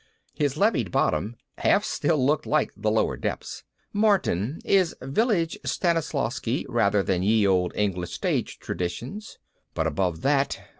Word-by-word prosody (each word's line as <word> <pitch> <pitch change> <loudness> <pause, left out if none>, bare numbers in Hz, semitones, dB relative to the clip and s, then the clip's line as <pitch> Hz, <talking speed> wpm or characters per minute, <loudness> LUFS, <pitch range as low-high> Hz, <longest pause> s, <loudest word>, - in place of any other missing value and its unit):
His 145 -1 -1
levied 155 - +2
bottom 85 +7 0 0.2
half - - +3
still - - 0
looked 150 +2 +1
like 155 - +1
The 105 0 -1
Lower 110 +1 +1
Depths. - - -5 0.3
Martin 180 - +1
is 190 -3 +3
Village 170 - 0
Stanislavsky 140 -7 -1
rather 105 -5 +2
than 90 -2 0
Ye 105 +2 +3
Olde 90 -2 +2
English 90 -4 -1
Stage - - -1
Traditions. 120 - -5 0.4
But 80 - 0
above 80 +1 -1
that 140 0 +1
120 Hz, 135 wpm, -25 LUFS, 95-160 Hz, 0.4 s, half